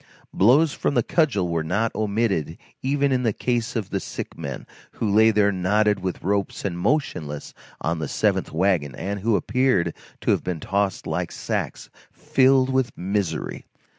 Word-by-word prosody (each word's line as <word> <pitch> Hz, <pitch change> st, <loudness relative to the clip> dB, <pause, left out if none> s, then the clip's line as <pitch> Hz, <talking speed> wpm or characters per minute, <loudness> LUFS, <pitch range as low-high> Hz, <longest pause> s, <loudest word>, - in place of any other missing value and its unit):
Blows 135 Hz, -, +4 dB
from 140 Hz, -, -1 dB
the 120 Hz, -, +3 dB
cudgel 120 Hz, -, +1 dB
were 85 Hz, -2 st, -1 dB
not 100 Hz, +8 st, 0 dB
omitted 100 Hz, -7 st, -1 dB, 0.2 s
even 140 Hz, +1 st, +1 dB
in 130 Hz, -1 st, +2 dB
the 115 Hz, -3 st, +2 dB
case 120 Hz, +1 st, -1 dB
of 105 Hz, -4 st, -3 dB
the 100 Hz, -, 0 dB
sick -, -, -6 dB
men, 70 Hz, -2 st, -6 dB, 0.3 s
who 110 Hz, -, -2 dB
lay 110 Hz, +2 st, +5 dB
there 105 Hz, -2 st, +3 dB
knotted 105 Hz, +2 st, +2 dB
with 95 Hz, -1 st, -4 dB
ropes 100 Hz, +2 st, -1 dB
and 85 Hz, -3 st, -2 dB
motionless 80 Hz, -, -1 dB, 0.3 s
on 80 Hz, +1 st, -1 dB
the 80 Hz, -, -2 dB
seventh -, -, 0 dB
wagon, 80 Hz, -6 st, +1 dB
and 100 Hz, +8 st, -3 dB
who 110 Hz, +2 st, +2 dB
appeared 115 Hz, -7 st, +1 dB, 0.3 s
to -, -, +2 dB
have -, -, +1 dB
been 90 Hz, -3 st, -3 dB
tossed 100 Hz, +4 st, -1 dB
there -, -, -5 dB
like -, -, -2 dB
sacks -, -, -4 dB, 0.2 s
filled 130 Hz, 0 st, +3 dB
with 130 Hz, -2 st, 0 dB
misery. 95 Hz, -3 st, -2 dB
100 Hz, 170 wpm, -24 LUFS, 90-120 Hz, 0.3 s, lay